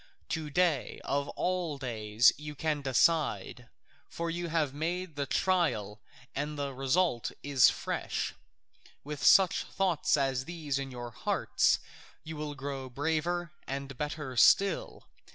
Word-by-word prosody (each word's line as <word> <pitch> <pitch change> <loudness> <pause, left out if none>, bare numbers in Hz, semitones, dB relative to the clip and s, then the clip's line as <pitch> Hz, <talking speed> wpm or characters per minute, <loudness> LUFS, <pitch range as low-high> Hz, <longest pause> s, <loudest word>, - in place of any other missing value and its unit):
To 155 -2 -2
day 160 -3 +1
of 140 0 -1
all 180 -5 -1
days 115 -3 +3
you 150 0 -8
can 150 0 -1
decide, 130 - +1 0.4
for 170 0 -3
you 175 +1 -3
have 155 -4 0
made 170 +2 -3
the 140 -1 -2
trial 115 - 0 0.3
and 150 +2 -3
the 140 -1 -3
result 135 0 +1
is 140 -4 +5
fresh. - - -3 0.7
With 150 0 -6
such 190 -2 +6
thoughts 185 -6 +1
as 135 -2 0
these 155 -5 -3
in 135 -1 -4
your 120 -2 -7
hearts - - +1 0.5
you 160 0 -7
will 150 -1 -5
grow 135 -1 -5
braver 160 +5 -1 0.2
and 140 0 -5
better 145 -1 -4
still. 195 - +4
145 Hz, 135 wpm, -30 LUFS, 135-165 Hz, 0.7 s, such